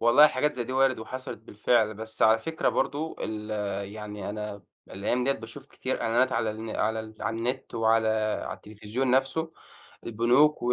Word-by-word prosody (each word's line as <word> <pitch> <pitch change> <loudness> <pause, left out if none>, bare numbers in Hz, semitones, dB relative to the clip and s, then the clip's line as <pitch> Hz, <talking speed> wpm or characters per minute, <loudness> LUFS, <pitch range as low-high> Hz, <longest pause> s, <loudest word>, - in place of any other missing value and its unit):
والله 125 +6 +8
حاجات 150 +1 0
زي 120 -2 -2
دي 130 - -5
وارد 130 -1 +3
وحصلت 130 +2 -6
بالفعل، 110 +1 +1
بس 110 +1 -5
على 110 +1 +6
فكرة 160 +8 -1
برضه 150 +3 -1
ال 110 0 -4 0.4
يعني 105 -2 -6
أنا 105 -1 -5 0.3
الأيام 120 +6 -1
دِيّة 135 - +3
باشوف 125 +3 -9
كتير 130 -2 -3
إعلانات 125 +3 +2
على 110 - +1
الن 110 +1 -6
على 110 +1 0
ال 110 0 -10
على 110 +2 -2
النت، 125 +3 -3
وعلى 115 0 +3 0.4
على - - -4
التليفزيون 110 +5 -3
نفسه 135 +5 +1 0.5
البنوك 120 +7 +3
و 125 - +2
115 Hz, 175 wpm, -27 LUFS, 110-130 Hz, 0.5 s, والله